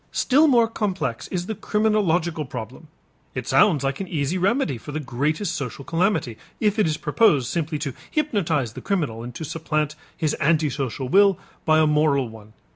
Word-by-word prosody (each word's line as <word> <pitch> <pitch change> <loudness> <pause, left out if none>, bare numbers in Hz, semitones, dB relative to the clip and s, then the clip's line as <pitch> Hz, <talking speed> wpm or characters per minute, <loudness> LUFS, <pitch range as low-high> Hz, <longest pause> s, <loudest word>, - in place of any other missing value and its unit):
Still 290 +5 +4
more 240 -5 +5
complex 185 - -3
is 180 -2 -3
the 220 - -3
criminological 195 -7 +1
problem. 130 +5 -8 0.5
It 125 -1 -4
sounds 140 +2 +4
like 135 0 -1
an 190 - -4
easy 150 -1 -1
remedy 185 - +1
for 150 - -9
the 155 - -3
greatest 155 +7 -1
social 140 -2 -5
calamity, 165 - 0 0.2
if 210 -1 +1
it 210 - +4
is 155 -1 -1
proposed 150 - +3
simply 160 -2 -1
to 140 -3 -4 0.2
hypnotize 170 - 0
the - - -8
criminal 150 - -1
and 120 0 -8
to 160 - -5
supplant 155 -1 -2 0.2
his 155 -2 0
antisocial 140 -4 0
will 195 +4 +5 0.3
by 155 -1 +4
a 155 - +5
moral 150 -3 +2
one. 110 -1 -14
155 Hz, 175 wpm, -23 LUFS, 140-195 Hz, 0.5 s, more